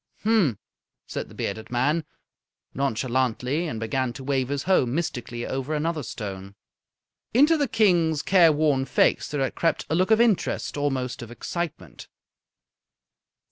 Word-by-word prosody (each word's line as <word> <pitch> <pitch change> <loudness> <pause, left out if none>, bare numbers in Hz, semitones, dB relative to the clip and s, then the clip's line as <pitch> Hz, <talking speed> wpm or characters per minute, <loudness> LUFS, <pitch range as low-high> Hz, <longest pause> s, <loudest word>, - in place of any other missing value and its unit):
"Mphm!" 205 - +3 0.5
said - - -5
the - - -14
bearded 110 +2 -4
man, 145 +7 +1 0.7
nonchalantly, 130 +3 0
and 115 -7 -4
began 120 +3 -1
to 135 +2 -9
wave 130 -2 0
his 140 -1 -2
hoe 190 -4 +3
mystically 120 -4 -3
over 135 +3 -3
another 160 +1 -1
stone. 100 -5 -7 0.8
Into 295 +6 +6
the 290 -3 +1
King's 175 -9 +2
careworn 155 -7 +4
face - - +2
there 145 -2 -3
had 135 - 0
crept 165 - 0
a - - +3
look 185 +4 +2
of 220 0 +5
interest, 230 -5 +1
almost 135 -3 -2
of 120 - -8
excitement. 120 - -6
140 Hz, 140 wpm, -25 LUFS, 125-170 Hz, 0.8 s, Into